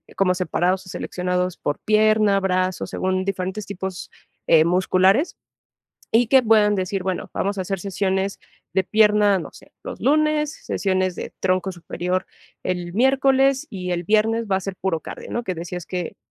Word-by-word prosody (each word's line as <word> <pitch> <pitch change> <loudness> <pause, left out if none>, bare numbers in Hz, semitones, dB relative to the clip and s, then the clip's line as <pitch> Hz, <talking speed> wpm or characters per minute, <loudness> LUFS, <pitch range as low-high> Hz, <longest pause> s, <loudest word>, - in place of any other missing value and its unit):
como 190 -2 +2
separados, 185 +1 0
o - - -12
seleccionados, 180 0 -2
por 145 - -3
pierna, 215 -1 +3
brazos, 185 -1 -1
según 185 0 -1
diferentes 195 +1 -3
tipos, 190 -2 -6 0.4
eh, 160 -1 +6
musculares. 185 - +3 0.8
Y 230 +1 +4
que 265 +2 +6
puedan 215 -2 +4
decir, 190 0 -2
bueno, 185 -1 -3
vamos 200 +1 -1
a 190 - -1
hacer 195 +1 -3
sesiones 190 +1 -1 0.3
de 190 +1 +2
pierna, 210 -2 +4
no - - -8
sé, - - -17
los - - -7
lunes, 305 +1 +2
sesiones 185 -2 0
de - - -7
tronco 185 0 +1
superior 180 +2 -3 0.4
el 175 -1 -3
miércoles, 270 +3 +3
y 180 -2 -5
el 175 0 -1
viernes 220 +2 +2
va 190 - +3
a 190 - -5
ser 195 0 -5
puro 170 -4 -1
cardio, - - -9
¿no?, 235 - -2
que 185 - -2
decías, 175 +1 -6
que 180 -2 -4
190 Hz, 165 wpm, -22 LUFS, 180-215 Hz, 0.8 s, eh